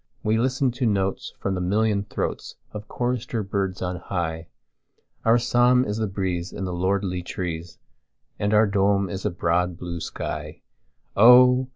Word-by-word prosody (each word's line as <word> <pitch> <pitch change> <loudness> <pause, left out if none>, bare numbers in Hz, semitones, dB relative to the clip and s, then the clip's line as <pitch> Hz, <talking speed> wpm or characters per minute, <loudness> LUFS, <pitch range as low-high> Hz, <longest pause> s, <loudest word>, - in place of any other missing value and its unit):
We 110 +1 +1
listen 130 +1 +1
to 125 0 -1
notes 95 -2 -1
from 100 - -2
the 90 - -2
million 100 +2 +1
throatsOf 105 +1 -6
chorister 120 -2 -2
birds 95 -1 -2
on 90 0 -3
high, 85 -3 -4 0.8
Our 115 +1 +5
psalm 125 +1 +3
is 105 +1 -3
the 110 -1 -1
breeze 95 -2 -3
in - - -6
the 90 - -4
lordly 95 0 -1
trees, 85 -1 -5 0.6
And 100 0 0
our 110 +1 +5
dome 100 -1 +1
is 95 - -4
the 105 - 0
broad 85 0 0
blue 85 -1 -5
sky, - - -6 0.5
Oh! 125 +3 +7
100 Hz, 155 wpm, -24 LUFS, 90-115 Hz, 0.8 s, Oh